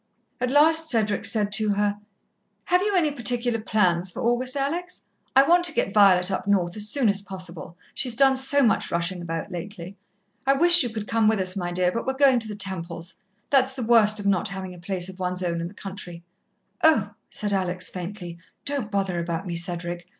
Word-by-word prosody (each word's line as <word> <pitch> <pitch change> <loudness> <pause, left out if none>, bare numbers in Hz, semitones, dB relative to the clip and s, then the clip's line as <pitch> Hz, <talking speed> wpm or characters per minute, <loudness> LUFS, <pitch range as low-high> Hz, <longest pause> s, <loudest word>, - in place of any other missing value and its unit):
At 250 0 -1
last 315 +3 +4
Cedric 215 -5 +1
said 210 -2 0
to 215 -1 +2
her: 205 0 0 0.7
"Have 360 +1 +2
you 410 0 0
any 320 -5 +2
particular 240 -2 0
plans 185 -5 +1
for - - -6
August, 250 +3 +1
Alex? 345 +6 -3 0.3
I 270 +1 +6
want 350 +1 +4
to 335 - +2
get 195 - -1
Violet 195 -3 +5
up 190 - -3
north 180 -4 +1
as 210 0 +1
soon 265 0 +2
as 200 -1 +1
possible, 185 -3 -9 0.2
she's 250 -3 -1
done 270 +1 +5
so 270 +2 +3
much 220 -5 +2
rushing 170 +1 -2
about 165 +2 -5
lately. 180 +1 -8 0.5
I 275 - +5
wish 345 +5 +6
you 245 - 0
could 215 -2 -6
come 225 -1 +2
with 220 -1 +2
us, 185 0 0
my 175 -2 -3
dear, 180 0 +1
but 230 +6 -4
we're 265 - 0
going 265 -2 +4
to 225 - +1
the 210 - -6
Temples' 180 -3 -4 0.4
that's 265 -1 +3
the 260 -2 -5
worst 220 -2 +4
of 205 - -6
not 200 0 +1
having 190 -2 -7
a 175 - -13
place 180 0 -3
of 190 0 -11
one's 180 0 -3
own 170 -1 -2
in 170 - -4
the 190 - -13
country 185 -4 -8 0.3
" - - -34
"Oh," 225 -11 +4 0.2
said 205 -1 -3
Alex 180 -2 -2
faintly, 175 -2 -7 0.3
"don't 280 -7 -2
bother 195 -4 -1
about 170 +2 -4
me, 175 -2 -4
Cedric. 175 0 -5
205 Hz, 210 wpm, -24 LUFS, 180-250 Hz, 0.7 s, I